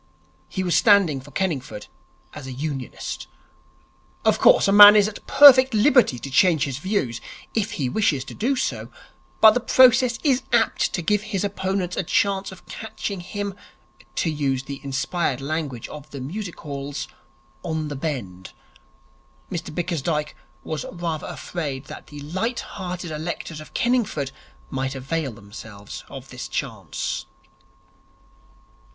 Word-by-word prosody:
He 190 Hz, -, -3 dB
was 175 Hz, -2 st, +1 dB
standing 200 Hz, -, +4 dB
for 140 Hz, -, -14 dB
Kenningford 145 Hz, -, -3 dB, 0.5 s
as 145 Hz, -3 st, -8 dB
a -, -, -6 dB
Unionist. 135 Hz, -1 st, -5 dB, 1.0 s
Of -, -, +3 dB
course, -, -, +6 dB
a -, -, +3 dB
man 205 Hz, +1 st, +11 dB
is 205 Hz, -1 st, +5 dB
at 215 Hz, -, -9 dB
perfect 265 Hz, -3 st, +8 dB
liberty 245 Hz, -, +4 dB
to 135 Hz, +3 st, -7 dB
change 155 Hz, +2 st, +4 dB
his 135 Hz, -1 st, -3 dB
views, 150 Hz, -, -1 dB, 0.3 s
if 215 Hz, -2 st, -1 dB
he 135 Hz, -, -1 dB
wishes 140 Hz, -, +1 dB
to -, -, -9 dB
do 265 Hz, +5 st, 0 dB
so, -, -, -2 dB, 0.5 s
but 220 Hz, -, +10 dB
the 245 Hz, -, +1 dB
process 250 Hz, -1 st, +5 dB
is 270 Hz, -4 st, +3 dB
apt -, -, +2 dB
to 180 Hz, -, -2 dB
give 210 Hz, +3 st, +2 dB
his 210 Hz, -3 st, -3 dB
opponents 190 Hz, -2 st, -2 dB
a -, -, 0 dB
chance 195 Hz, +3 st, 0 dB
of 190 Hz, -, -13 dB
catching 215 Hz, -3 st, -6 dB
him 200 Hz, +3 st, -4 dB, 0.6 s
(to 165 Hz, -, 0 dB
use 135 Hz, -3 st, -1 dB
the 140 Hz, 0 st, -7 dB
inspired 135 Hz, +1 st, -1 dB
language 140 Hz, -4 st, -4 dB
of 150 Hz, 0 st, -10 dB
the 140 Hz, -, -8 dB
music 175 Hz, +8 st, -6 dB
halls) 140 Hz, -1 st, -5 dB, 0.5 s
on 160 Hz, -2 st, -3 dB
the 145 Hz, -, -5 dB
bend. 120 Hz, -, -5 dB, 1.0 s
Mr -, -, -4 dB
Bickersdyke 160 Hz, -2 st, -2 dB, 0.3 s
was 155 Hz, -2 st, -4 dB
rather 170 Hz, -3 st, -4 dB
afraid 145 Hz, -6 st, -5 dB
that -, -, -10 dB
the 145 Hz, -1 st, -10 dB
light 190 Hz, -, -2 dB
hearted 180 Hz, -3 st, -6 dB
electors 155 Hz, 0 st, -5 dB
of 155 Hz, -, -14 dB
Kenningford 225 Hz, -, 0 dB, 0.4 s
might 135 Hz, 0 st, -2 dB
avail 135 Hz, +2 st, -2 dB
themselves 105 Hz, -1 st, -10 dB
of -, -, -10 dB
this -, -, -7 dB
chance. -, -, -4 dB
165 Hz, 145 wpm, -23 LUFS, 135-200 Hz, 1.0 s, man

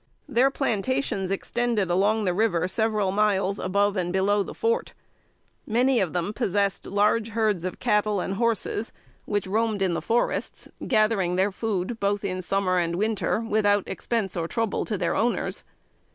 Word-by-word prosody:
Their 250 Hz, +4 st, +3 dB
plantations 245 Hz, -5 st, -1 dB
extended 215 Hz, -1 st, -1 dB
along 205 Hz, +4 st, +2 dB
the 180 Hz, -, +1 dB
river 180 Hz, -4 st, +1 dB
several 210 Hz, -1 st, 0 dB
miles, 200 Hz, -1 st, +1 dB
above 200 Hz, +2 st, +1 dB
and 175 Hz, -2 st, -1 dB
below 200 Hz, +2 st, +2 dB
the -, -, -5 dB
fort. 465 Hz, +2 st, -1 dB, 0.7 s
Many 245 Hz, +3 st, +3 dB
of 180 Hz, -4 st, 0 dB
them 180 Hz, +3 st, -2 dB
possessed 200 Hz, -4 st, -1 dB
large 210 Hz, +3 st, +2 dB
herds 215 Hz, -5 st, 0 dB
of 185 Hz, -, -4 dB
cattle 210 Hz, -1 st, +1 dB
and 190 Hz, -, -2 dB
horses, 225 Hz, 0 st, -1 dB, 0.3 s
which 205 Hz, -2 st, -1 dB
roamed 215 Hz, +1 st, 0 dB
in 185 Hz, -2 st, +1 dB
the -, -, -2 dB
forests, 235 Hz, +1 st, -1 dB, 0.2 s
gathering 215 Hz, -6 st, +2 dB
their 190 Hz, +2 st, +2 dB
food, 215 Hz, +1 st, -3 dB
both 200 Hz, 0 st, 0 dB
in 185 Hz, -1 st, -2 dB
summer 185 Hz, 0 st, +1 dB
and 170 Hz, -1 st, -1 dB
winter, 215 Hz, +2 st, 0 dB
without 205 Hz, -3 st, +1 dB
expense 200 Hz, -1 st, -2 dB
or 165 Hz, -2 st, -2 dB
trouble 225 Hz, +1 st, -1 dB
to 215 Hz, -, -2 dB
their 180 Hz, -2 st, 0 dB
owners. 235 Hz, +2 st, -1 dB
205 Hz, 160 wpm, -25 LUFS, 190-225 Hz, 0.7 s, Their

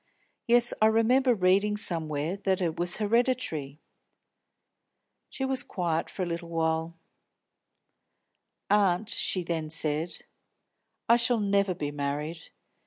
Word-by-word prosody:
Yes, 240 Hz, 0 st, +5 dB
I 215 Hz, -, +6 dB
remember 240 Hz, +3 st, +3 dB
reading 200 Hz, +2 st, +2 dB
somewhere 160 Hz, -3 st, -2 dB
that 190 Hz, -2 st, -1 dB
it 170 Hz, -3 st, -2 dB
was 175 Hz, 0 st, -1 dB
hereditary." 215 Hz, -, -1 dB, 1.5 s
She 265 Hz, -, -4 dB
was 265 Hz, 0 st, +1 dB
quiet 170 Hz, -, -2 dB
for 190 Hz, -, -4 dB
a -, -, -1 dB
little. 165 Hz, -1 st, -2 dB, 1.7 s
"Aunt," 200 Hz, 0 st, +2 dB
she 185 Hz, -, 0 dB
then 165 Hz, -2 st, -3 dB
said, 155 Hz, +1 st, +1 dB, 0.8 s
"I 235 Hz, -, +6 dB
shall 240 Hz, 0 st, +2 dB
never 200 Hz, -2 st, +1 dB
be 145 Hz, -3 st, -4 dB
married. 145 Hz, +3 st, -4 dB
180 Hz, 110 wpm, -27 LUFS, 160-215 Hz, 1.7 s, I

